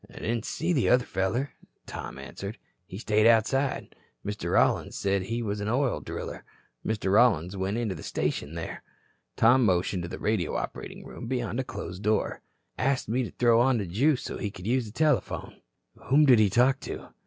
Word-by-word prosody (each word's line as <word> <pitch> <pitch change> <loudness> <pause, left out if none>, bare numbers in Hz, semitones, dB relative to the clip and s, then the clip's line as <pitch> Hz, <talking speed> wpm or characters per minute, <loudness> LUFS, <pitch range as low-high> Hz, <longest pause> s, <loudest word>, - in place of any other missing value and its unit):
"Didn't 115 0 -3
see 175 +2 -1
the 135 -7 +2
other 125 0 +4
feller," 115 +9 -1 0.3
Tom - - -7
answered. 100 +3 -7 0.3
"He 95 - -8
stayed 110 0 +3
outside. 130 +4 +2 0.3
Mr. 105 -4 -3
Rollins - - +2
said 100 0 +1
he 115 +5 -3
was 105 -1 -2
an 105 - -3
oil 125 - +1
driller. - - -6 0.4
Mr. 105 -3 -1
Rollins 100 -6 +4
went 95 +3 -1
into 115 -5 -1
the 80 - -9
station 75 +3 -2
there." 85 - -5 0.5
Tom 125 +3 +5
motioned 90 -2 +1
to 85 - -5
the - - -6
radio 105 -6 0
operating - - -5
room 120 - -8
beyond 120 -3 -2
a - - 0
closed 95 -6 -7
door. 105 +1 0 0.4
"Asked 135 -4 0
me 125 +4 +1
to - - -6
throw 120 -1 +5
on 130 0 +3
the 105 - -2
juice 125 - +1
so - - -5
he 105 - -2
could 90 -2 -11
use 120 +1 +1
the - - -9
telephone." 150 +2 0 0.4
"Whom 150 +3 +5
did 125 -5 +7
he 105 -2 +5
talk 125 +6 +3
to?" - - -7
110 Hz, 190 wpm, -27 LUFS, 100-125 Hz, 0.5 s, did